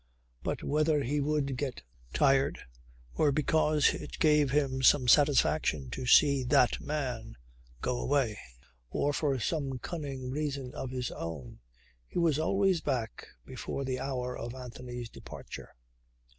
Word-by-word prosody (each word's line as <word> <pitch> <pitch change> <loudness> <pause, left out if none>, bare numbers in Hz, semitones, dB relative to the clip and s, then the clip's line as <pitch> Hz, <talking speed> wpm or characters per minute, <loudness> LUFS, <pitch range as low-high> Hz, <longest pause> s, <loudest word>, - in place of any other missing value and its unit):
But - - -3
whether 150 0 +2
he 145 +3 0
would 140 -2 0
get 135 - -4 0.3
tired 135 -1 +3 0.6
or 150 - +3
because 150 +1 +3
it - - -7
gave 150 -2 +4
him 135 -1 +1
some 130 -1 +5
satisfaction 140 - +3
to 125 - -4
see 140 0 +6
"that 125 -1 +3
man" 125 - -4 0.5
go 125 -1 0
away 130 -7 0 0.5
or 145 - 0
for 145 -3 0
some 135 0 -2
cunning 135 -4 -5
reason 140 -3 -3
of 130 - -5
his 125 -1 -3
own, 75 -7 -7 0.5
he - - -7
was 165 -4 +2
always 190 +2 +2
back 125 -6 -3 0.2
before 140 - -5
the 130 -1 -2
hour 125 -2 -3
of 120 +2 -6
Anthony's 125 -1 -7
departure. - - -10
135 Hz, 135 wpm, -30 LUFS, 125-150 Hz, 0.6 s, see